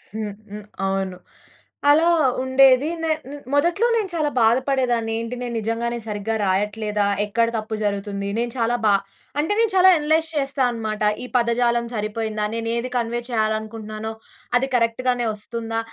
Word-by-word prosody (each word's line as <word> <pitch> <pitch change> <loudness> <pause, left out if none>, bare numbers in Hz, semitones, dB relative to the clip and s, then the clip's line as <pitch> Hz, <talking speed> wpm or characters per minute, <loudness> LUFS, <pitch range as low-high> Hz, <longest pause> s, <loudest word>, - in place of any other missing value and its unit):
హ్మ్. 215 -2 -3 0.2
హ్మ్. 210 0 -8 0.2
అవును. 190 -1 -2 0.7
అలా 320 +3 +5 0.4
ఉండేది 260 +1 +5 0.2
నే 320 - +1
హ్మ్. 270 - -11
ను - - -6 0.2
మొదట్లో 345 +10 +3
నేను 420 -4 0
చాలా 305 -2 +1
బాధ 225 +2 +5
పడేదాన్ని. 240 -4 +1
ఏంటి 230 +2 -4
నేను 245 -1 -4
నిజంగానే 235 +2 -2
సరిగ్గా 210 +1 -2
రాయట్లేదా? 210 +2 0 0.2
ఎక్కడ 230 +3 +1
తప్పు 215 0 -4
జరుగుతుంది? 200 -1 -2
నేను 235 0 -1
చాలా 230 +1 +2
బా 205 -1 +5 0.4
అంటే 320 +8 +1
నేను 455 -3 +3
చాలా 375 0 +7
అనలైజ్ 315 +1 +1
చేస్తానన్నమాట. 245 -7 -1 0.2
ఈ - - -4
పదజాలం 235 0 +2
సరిపోయిందా? 215 0 -2
నేనేది 230 +2 -2
కన్వే 235 0 0
చేయాలనుకుంటున్నానో, 220 -1 -2 0.5
అది 265 +2 0
కరెక్ట్‌గానే 245 +1 +1
వస్తుందా? 225 +2 -4
230 Hz, 145 wpm, -22 LUFS, 215-255 Hz, 0.7 s, చాలా